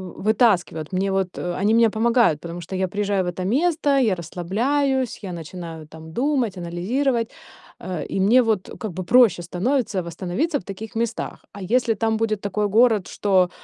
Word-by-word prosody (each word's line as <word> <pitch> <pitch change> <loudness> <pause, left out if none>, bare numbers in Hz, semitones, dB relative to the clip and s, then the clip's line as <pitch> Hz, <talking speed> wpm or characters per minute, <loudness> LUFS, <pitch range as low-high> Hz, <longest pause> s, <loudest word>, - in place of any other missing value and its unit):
вы - - -10
вытаскивают, 180 -9 +2
мне 195 +1 0
вот, 190 -2 -1
э, 175 - -3
они 210 +2 +3
мне 230 0 +5
помогают, 230 -6 +2
потому 170 +2 -7
что 175 +3 -7
я 190 0 0
приезжаю 200 0 0
в - - -4
это 180 +1 -3
место, 300 - +1
я 225 -8 +3
расслабляюсь, 240 - -1
я 185 -3 -5
начинаю 165 -1 -8
там 160 +1 -12
думать, 250 - 0
анализировать, 230 +8 -1 0.5
э, 180 -3 -5
и - - -3
мне 220 +7 +5
вот, 220 -5 0
э, - - -10
как 215 - -5
бы 185 +2 -5
проще 235 -2 +5
становится 200 +4 -1
восстановиться 180 - -2
в - - -15
таких 210 +5 -8
местах. 230 0 -3
А 200 - -9
если 235 +4 +2
там 220 +1 0
будет 215 -2 -1
такой 205 +1 -1
город, 220 -2 +4
что 190 -3 +2
200 Hz, 185 wpm, -22 LUFS, 180-235 Hz, 0.5 s, мне